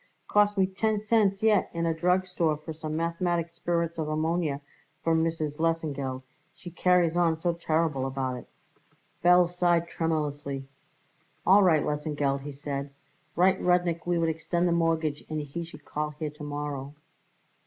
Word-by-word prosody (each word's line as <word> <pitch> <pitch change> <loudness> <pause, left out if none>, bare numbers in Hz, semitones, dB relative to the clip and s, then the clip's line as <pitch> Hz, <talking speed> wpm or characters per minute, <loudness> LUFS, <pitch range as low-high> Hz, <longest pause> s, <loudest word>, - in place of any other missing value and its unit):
Cost 205 0 +3
me 190 - +5
ten 210 +3 0
cents 210 -2 +2
yet 215 -3 +4
in 170 0 0
a 165 - +2
drug 180 +3 +2
store 170 -4 0
for 155 +1 -7
some 155 0 -5
mathematic 170 0 -1
spirits 170 -1 -2
of 155 -1 -2
ammonia 155 -1 0 0.4
for 165 - +2
Mrs. 160 -2 -1
Lesengeld 145 -6 -1 0.3
she 175 - -10
carries 180 -1 +3
on 170 -2 +3
so 170 +1 0
terrible 160 -5 0
about 130 -1 -2
it." 125 - -9 0.8
Belz 175 0 +6
sighed 175 -1 +2
tremulously. 145 -5 -2 0.8
"All 195 +3 +7
right, 165 -6 +4
Lesengeld," 145 -2 -1
he 145 +1 -6
said; 140 0 -5 0.5
"write 185 +2 +3
Rudnik 175 -2 +1
we 175 -1 +2
would 165 -1 +2
extend 165 +2 0
the - - +1
mortgage 165 -3 +1
and 155 0 -2
he 150 +3 -5
should 150 -3 -12
call 150 0 -2
here 150 0 -5
to 150 0 -11
morrow." 145 -1 -5
165 Hz, 160 wpm, -28 LUFS, 150-175 Hz, 0.8 s, All